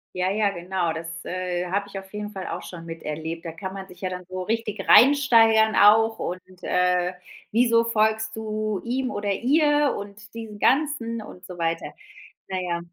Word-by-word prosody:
Ja, 185 +1 0
ja, 210 0 +2
genau. 180 -2 -2
Das, 160 +1 -5 0.2
äh, 180 -1 -3
habe 200 +2 0
ich 195 -1 -6
auf 190 0 -14
jeden 210 0 -5
Fall 190 -3 -6
auch - - -5
schon 170 -2 -9
miterlebt. 165 0 -6
Da 165 - -4
kann 190 +3 -7
man 195 -1 -7
sich 180 -1 -16
ja 185 - -2
dann 180 0 -6
so 185 0 -5
richtig 215 0 -3
reinsteigern 230 -5 +6
auch. 225 +2 +6
Und, 180 +1 -4 0.2
äh, 180 0 +1 0.4
wieso 230 0 +4
folgst 220 -1 +1
du 215 -2 -3
ihm 255 +2 -2
oder 205 0 -2
ihr 295 +6 +3
und 205 +1 -9
diesem 225 -2 -8
Ganzen 250 -3 +1
und 180 -3 -12
so 180 -1 -10
weiter. 165 0 -2 0.5
Na 185 -1 -3
ja. 175 -1 -2
200 Hz, 180 wpm, -24 LUFS, 180-225 Hz, 0.5 s, reinsteigern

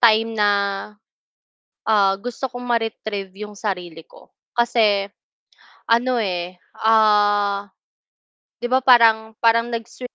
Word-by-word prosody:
time 225 -1 +4
na, 210 -2 +2 1.3
ah, 200 -3 +3
gusto 245 +3 -5
kong 245 -1 -9
mare-retrieve 215 -4 -3
yung 210 -1 -9
sarili 175 -6 -5
ko - - -19 0.2
kasi, 215 -4 +2 0.8
ano, 240 +2 +2
eh, 180 -2 -4 0.3
ah, 205 -2 +3 1.0
'di 240 - -2
ba, 260 - +5
parang 225 -3 +4
parang 230 0 +3
nags 230 +2 -7
220 Hz, 105 wpm, -21 LUFS, 200-230 Hz, 1.3 s, ba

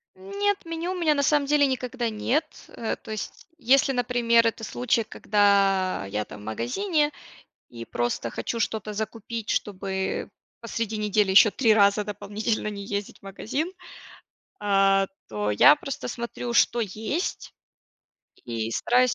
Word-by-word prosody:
Нет, 400 +1 -2
меню 330 +2 -3
у - - -4
меня 335 -4 +2
на 285 - +1
самом 290 0 +2
деле 290 0 +4
никогда 250 -2 -2
нет. 250 +8 0 0.2
Э, 225 - -4
то - - -13
есть, 215 -1 -6
если, 270 +1 +4
например, 240 -2 +2
это 230 0 -1
случай, 235 0 0
когда 200 - +2
я, 105 +2 -3
там, - - -11
в - - -12
магазине 295 - 0 0.6
и 115 -1 -8
просто 120 0 -2
хочу 230 - -4
что-то 215 -1 -2
закупить, 220 +1 -5
чтобы 190 -1 -2 0.3
посреди 230 -1 -3
недели 210 -1 +1
еще 200 +3 +7
3 225 0 +3
раза 205 0 +4
дополнительно 210 +2 -3
не 200 -1 -6
ездить 200 0 -4
в - - -50
магазин. 230 - -4 0.9
А 195 -1 +3 0.2
то 105 -1 -2
я 105 +7 +7
просто 275 - -6
смотрю, 235 0 -5
что 235 - +3
есть, 220 - -3 0.9
и 115 -1 -3
стараюсь 250 - +2
220 Hz, 145 wpm, -25 LUFS, 195-255 Hz, 0.9 s, еще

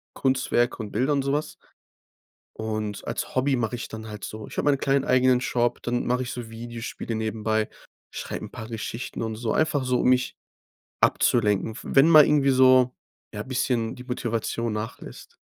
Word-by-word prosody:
Kunstwerke 130 -2 +1
und 110 -3 -6
Bilder 130 +7 +1
und 140 - +1
so 135 - -1
was. 150 +2 -2 1.0
Und 110 -2 -4
als - - -4
Hobby 130 +1 +2
mache 120 0 -1
ich 120 - -5
dann 110 0 -8
halt 105 -2 -7
so 110 0 -7
ich - - -11
habe - - -1
meinen 140 - +2
kleinen 135 0 +1
eigenen 130 0 +4
Shop, 120 -2 0
dann 120 0 -1
mache 125 +1 +1
ich 125 - -5
so 120 -2 -6
Videospiele 115 0 -6
nebenbei, 110 0 -1 0.4
schreib - - -5
'n - - -7
paar 110 - -8
Geschichten 115 +1 -5
und 110 -1 -2
so. 110 0 -2
Einfach 150 -4 +1
so, 125 -1 +1
um - - +2
mich 125 0 +2 0.7
abzulenken, 105 -2 +2
w - - -7
wenn 135 +4 +4
mal 155 -3 +9
irgendwie 140 -2 +3
so, 130 -1 +5 0.4
ja, 105 - -3
bisschen 125 -3 -1
die 125 - -10
Motivation 115 -2 -2
nachlässt. 110 +1 -7
120 Hz, 180 wpm, -25 LUFS, 110-130 Hz, 1.0 s, mal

